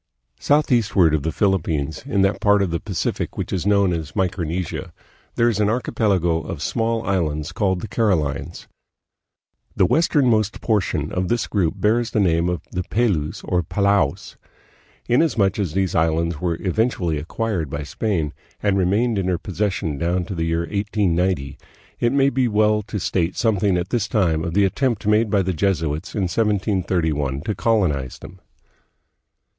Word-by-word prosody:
Southeastward 115 - +3
of 80 - +1
the 80 +3 -2
Philippines, 80 -7 0
in 100 -8 +2
that 95 - +1
part 105 -1 +4
of 90 - -2
the 85 - -1
Pacific - - -3
which - - -3
is 95 0 -1
known 100 -3 +3
as 80 +1 -5
Micronesia, 90 -3 -2 0.4
there 115 - +3
is 110 -3 0
an 105 -1 +2
archipelago 95 -8 +1
of 80 - -6
small 115 0 -1
islands 80 -5 -1
called 95 0 0
the - - -5
Carolines. 85 - -1 1.1
The - - +4
westernmost 120 - +2
portion 90 -9 0
of 90 0 -1
the 120 - +1
group 95 -5 +1
bears 110 +4 +1
the 110 - 0
name 85 -3 +2
of 90 -4 -2
the 90 - -2
Pelews, 95 -7 -1
or 90 -1 0
Palaos. 100 -4 0 0.7
In 120 +4 +4
asmuch 105 - +1
as 90 -7 -1
these 95 -1 0
islands 80 0 0
were 85 -2 -1
eventually 95 -5 0
acquired 90 0 -3
by 70 +2 -4
Spain 80 -2 -2 0.3
and 100 -2 +1
remained 105 +4 +1
in 95 - -1
her 90 -2 +1
possession 95 -6 -2
down 90 +2 0
to 95 - -5
the 80 -2 -2
year 85 0 0
1890, 95 -5 -1 0.4
it 120 - +2
may 140 0 +3
be 130 0 +1
well 105 -1 +2
to 105 0 -5
state 90 -1 -1
something 105 -5 +2
at 90 +1 -3
this 120 -3 0
time 85 -8 +1
of 85 +1 -3
the 100 0 +4
attempt 115 +3 -1
made 105 +1 +3
by 100 -1 +2
the 95 0 -1
Jesuits 80 -2 -1
in 100 - 0
1731 90 - 0
to 105 +7 -2
colonize 90 - 0
them. 95 +2 -12
95 Hz, 165 wpm, -21 LUFS, 85-105 Hz, 1.1 s, part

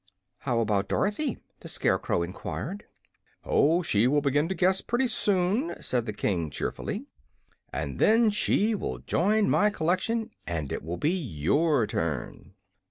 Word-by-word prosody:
"How 120 -4 0
about 100 -3 +1
Dorothy?" 225 +7 0 0.2
the - - -10
Scarecrow 85 - 0
enquired. 130 - -5 0.6
"Oh, 165 +5 +3
she 110 -4 +3
will 145 +3 +3
begin 145 +3 +1
to 190 - -1
guess, 185 +1 +2
pretty 240 +2 0
soon," 205 - 0
said 120 -2 -1
the - - -1
King, 90 -6 -1
cheerfully. - - -4 0.7
"And 70 +1 -4
then 225 0 +5
she 210 +1 +2
will 65 - -3
join 200 - +1
my 210 - +4
collection, 210 +6 -1 0.2
and 80 -5 -3
it - - -3
will 85 +4 -5
be 155 - +1
your 140 - +1
turn." 85 -7 -4
155 Hz, 145 wpm, -27 LUFS, -, 0.7 s, then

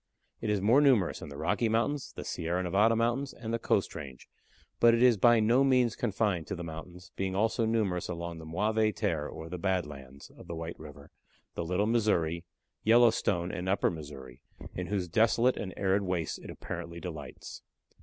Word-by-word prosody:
It 110 - -2
is 105 -2 +1
more 115 +8 +5
numerous 125 -11 +3
in - - -7
the 70 - -9
Rocky 100 +9 0
Mountains, 120 +5 0
the - - -6
Sierra 85 +3 -2
Nevada 100 +6 +3
Mountains, 120 +4 0
and 115 -1 -5
the 115 - 0
Coast 100 -3 0
Range, 70 -5 -9 0.5
but 115 0 +6
it 115 - +2
is 125 -2 +6
by 120 +3 +5
no 115 +5 +4
means 125 -3 +3
confined 100 -6 -1
to 95 - -3
the 85 - -6
mountains, 85 +3 -9
being 95 -1 -2
also 110 +2 +1
numerous 100 -7 0
along 85 -1 -5
the 80 - -9
Mauvaises 110 +6 +1
Terres 80 -9 -1
or 80 - -8
the 90 +1 -6
"Bad 95 -2 0
Lands" 70 -2 -11
of - - -15
the 85 - -5
White 80 +1 -6
River, 75 -2 -12 0.4
the 85 - -3
Little 90 +5 0
Missouri, 95 -8 +1 0.4
Yellowstone, 110 -6 +3
and 95 0 -4
Upper 95 - +2
Missouri, 70 -5 -9 0.3
in 90 -1 -4
whose 100 -3 -1
desolate 115 +6 +3
and 95 - -5
arid 95 +1 +2
wastes 90 -5 -2
it - - -11
apparently 85 0 -7
delights. 75 -7 -8
95 Hz, 190 wpm, -30 LUFS, 85-115 Hz, 0.5 s, but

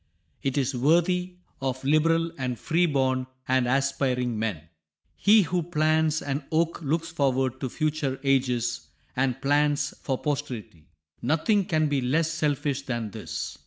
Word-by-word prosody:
It 135 0 -1
is 135 0 +1
worthy 175 +7 +2 0.3
of 130 -1 -2
liberal 165 +3 +2
and 125 -4 -3
freeborn 135 -6 +1 0.2
and 130 -1 +2
aspiring 125 -3 0
men. 105 -8 -2 0.5
He 210 +1 +5
who 175 +2 -1
plants 155 -1 +1
an 140 +1 -2
oak 165 +2 +1
looks 165 +2 -1
forward 130 -4 0
to 130 - -3
future 150 -2 -1
ages, 125 -4 +1 0.3
and 130 -1 0
plants 145 0 +2
for 135 -2 -1
posterity. 125 - -4 0.3
Nothing 165 - +2
can 155 -2 +1
be 145 -2 0
less 155 +6 +1
selfish 145 -3 -1
than 120 -5 -4
this. - - -6
140 Hz, 135 wpm, -26 LUFS, 130-160 Hz, 0.5 s, He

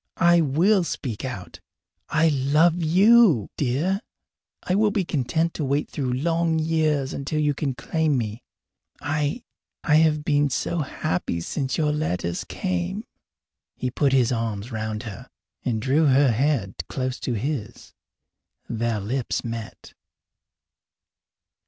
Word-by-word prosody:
I 170 0 +5
will 175 +7 +3
speak 125 -9 -4
out! 120 -8 -6 0.5
I 160 +1 +3
love 150 +5 +3
you, 185 - +5
dear! 155 - 0 0.6
I 180 - -1
will 210 +2 +3
be 200 -3 -1
content 160 +3 0
to 155 - -3
wait 140 +2 -1
through 135 -4 -2
long 165 +4 +1
years 155 -3 +1
until 145 +3 -2
you 150 -1 +2
can 135 -2 -2
claim 155 +3 0
me. 110 0 -3 0.6
I 150 - -2 0.4
I 150 -1 +4
have 155 -2 +3
been 145 -1 +2
so 170 +6 -1
happy 90 - -2
since 130 - -3
your 150 -2 +2
letters 90 - -2
came!" 90 -1 -3 0.7
He 125 - -3
put 140 +2 +1
his 130 -2 +3
arms 115 -1 -3
around 110 0 -3
her 105 -5 -9 0.3
and 115 -3 -1
drew 140 +6 +2
her 135 -1 +4
head 120 -5 0 0.2
close 130 -1 -3
to 125 - -2
his. 120 -1 -4 0.7
Their 115 -1 -1
lips 120 +5 -2
met. 115 -2 -7
140 Hz, 135 wpm, -24 LUFS, 120-160 Hz, 0.7 s, I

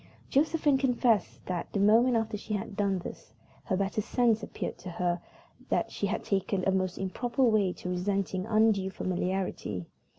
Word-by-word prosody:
Josephine 295 -1 +3
confessed 240 -6 +1
that, 180 -2 -3
the 200 - 0
moment 230 +5 +5
after 225 -1 0
she 210 +1 -3
had 205 0 -5
done 200 -2 +1
this, 175 - -9 0.3
her 190 - 0
better 195 +2 0
sense 230 0 +2
appeared - - -5
to - - -17
tell - - -8
her 175 0 0 0.5
that - - 0
she - - -1
had - - -2
taken 195 -1 0
a - - +4
most 185 -1 0
improper 240 +7 -1
way 215 -5 +4
of 180 - -9
resenting 185 +1 -1
undue 215 -3 +3
familiarity. 180 - -2
200 Hz, 170 wpm, -29 LUFS, 185-225 Hz, 0.5 s, moment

